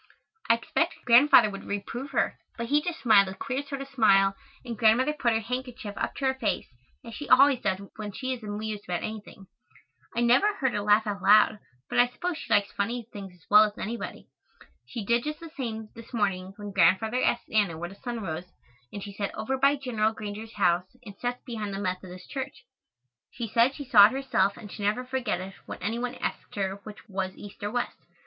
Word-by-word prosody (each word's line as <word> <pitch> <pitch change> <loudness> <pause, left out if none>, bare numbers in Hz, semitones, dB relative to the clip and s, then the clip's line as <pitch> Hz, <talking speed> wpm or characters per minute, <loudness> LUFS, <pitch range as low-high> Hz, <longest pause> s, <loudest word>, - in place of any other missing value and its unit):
I 230 - +7
expected 330 +9 -2
Grandfather 240 -3 +7
would 195 0 -8
reprove 230 +7 -5
her, - - 0 0.2
but 235 - -3
he 295 +1 +4
just 340 +1 -4
smiled 210 -5 +6
a 190 - -6
queer 265 +5 -3
sort 280 -1 -6
of - - -12
smile 195 -7 +4 0.3
and 235 -2 -4
Grandmother 230 +6 +4
put 255 -5 +1
her 225 - +2
handkerchief 250 -2 -5
up - - -3
to 275 - -3
her 265 - +3
face, 230 -6 -1 0.4
as 230 - -9
she 290 +5 -7
always 270 0 +6
does 190 -6 -1 0.2
when 210 -1 -5
she 260 +5 -3
is 250 - -7
amused 210 0 -5
about 175 -1 -3
anything. 215 -2 -7 0.7
I 235 - +1
never 255 - +4
heard 265 -9 0
her 205 - -1
laugh 210 +2 +4
out 200 -3 -3
loud, 210 +1 +5 0.3
but - - 0
I 245 - +6
suppose 330 +6 -4
she - - -9
likes 205 -2 +3
funny 230 +3 -3
things 195 -2 -7
as 175 - -25
well 210 +1 +8
as 210 -1 -2
anybody. 230 +3 -5 0.6
She 230 -4 -6
did 235 +2 +2
just 300 +1 -4
the 330 -2 -10
same, 220 -5 -4
this 230 +1 -10
morning, 195 -3 -1
when 205 -1 -7
Grandfather 195 +7 +3
asked 240 - 0
Anna 205 -7 +2
where 175 +1 -5
the - - -11
sun 235 +2 -5
rose, 175 +1 -5 0.4
and 200 - -6
she 200 - -8
said 200 0 -2
"over 220 +5 -2
by 275 +2 +4
Gen. 255 -5 -6 0.2
Granger's 215 +1 -7
house 180 0 +1
and 200 -3 -10
sets 245 0 -3
behind 215 -5 -5
the - - -4
Methodist 185 -1 -5
church." 265 -1 -6 0.7
She 235 -2 -5
said 235 +5 +3
she 285 - -7
saw 210 -5 +8
it 225 - -5
herself 260 -7 +1
and 205 - -10
should 210 - -8
never 210 +5 0
forget 250 -7 -1
it 190 +1 -7
when - - -6
any 225 +4 -1
one 250 +1 -3
asked - - -5
her 195 -1 -2
which 215 +1 -11
was 190 -2 -3
east 205 +1 -11
or 205 - -2
west. 245 +2 -3
220 Hz, 215 wpm, -27 LUFS, 200-250 Hz, 0.7 s, well